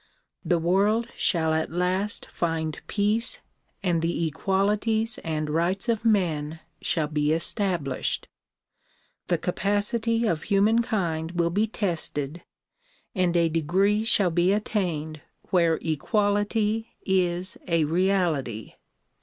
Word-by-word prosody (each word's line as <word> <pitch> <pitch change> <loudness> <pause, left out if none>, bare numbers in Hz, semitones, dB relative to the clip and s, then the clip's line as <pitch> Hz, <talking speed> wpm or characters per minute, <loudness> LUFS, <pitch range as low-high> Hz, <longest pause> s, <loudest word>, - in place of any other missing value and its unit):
The 175 - +2
world 200 +7 +2
shall 160 -3 +2
at 160 0 0
last 185 +4 -1
find 160 -2 -3
peace 215 +4 0 0.4
and 175 -4 +1
the 170 0 0
equalities 210 +7 0
and 155 -2 -3
rights 170 +8 0
of 225 -1 0
men 165 -8 +1 0.2
shall 160 - +1
be 150 0 0
established. 165 - 0 1.0
The 175 - +2
capacity 210 +6 0
of 165 -7 0
humankind 195 -6 +1
will 170 -1 +1
be 210 +5 +1
tested 170 -6 -2 0.7
and 180 -4 +1
a 170 -1 +4
degree 185 +7 +1
shall 200 -5 +3
be 175 +3 +3
attained 170 -8 -2 0.3
where 170 -3 +3
equality 205 +6 0
is 185 -1 0
a 165 -2 +2
reality. 165 - 0
180 Hz, 110 wpm, -26 LUFS, 160-205 Hz, 1.0 s, a